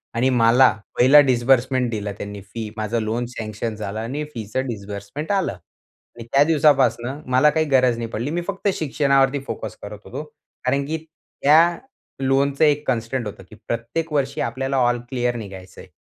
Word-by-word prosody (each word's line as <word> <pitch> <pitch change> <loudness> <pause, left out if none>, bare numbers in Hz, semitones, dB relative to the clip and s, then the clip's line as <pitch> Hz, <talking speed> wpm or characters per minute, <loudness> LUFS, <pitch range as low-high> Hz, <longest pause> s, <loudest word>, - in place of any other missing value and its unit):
आणि 125 +3 +2
मला 125 +1 +5 0.3
पहिला 135 +4 +7
डिस्बर्समेंट 130 0 +2
दिला 105 -2 -3
त्यांनी 100 0 -7
फी 105 +3 -7
माझं 110 +2 -1
लोन 110 +3 -2
सँक्शन 110 0 -4
झालं 105 0 -5
आणि 130 +7 -3
फीच 110 -3 -8
डिस्बर्समेंट 105 - -4
आलं 195 -2 +1
आणि 95 +6 -17
त्या 140 +1 +6
दिवसापासनं 145 -3 +2
मला 130 +4 +5
काही 155 +1 +1
गरज 130 -3 +3
नाही 115 -1 -3
पडली. 115 +5 -3
मी 175 +2 -1
फक्त 200 +1 -3
शिक्षणावरती 140 -3 +2
फोकस - - -5
करत - - -8
होतो. - - -6 0.4
कारण 140 +2 +1
की 160 +2 -2
त्या 160 +1 +2 0.4
लोनचं 135 +2 +1
एक 150 0 +2
कन्स्टंट 120 -1 -1
होतं 100 - -9
की - - -13
प्रत्येक 140 +8 -3
वर्षी 140 -1 0
आपल्याला 135 +3 -2
ऑल 120 -1 +2
क्लिअर 125 -2 -1
निघायचं 95 -4 -9
आहे. - - -14
125 Hz, 165 wpm, -22 LUFS, 115-140 Hz, 0.4 s, पहिला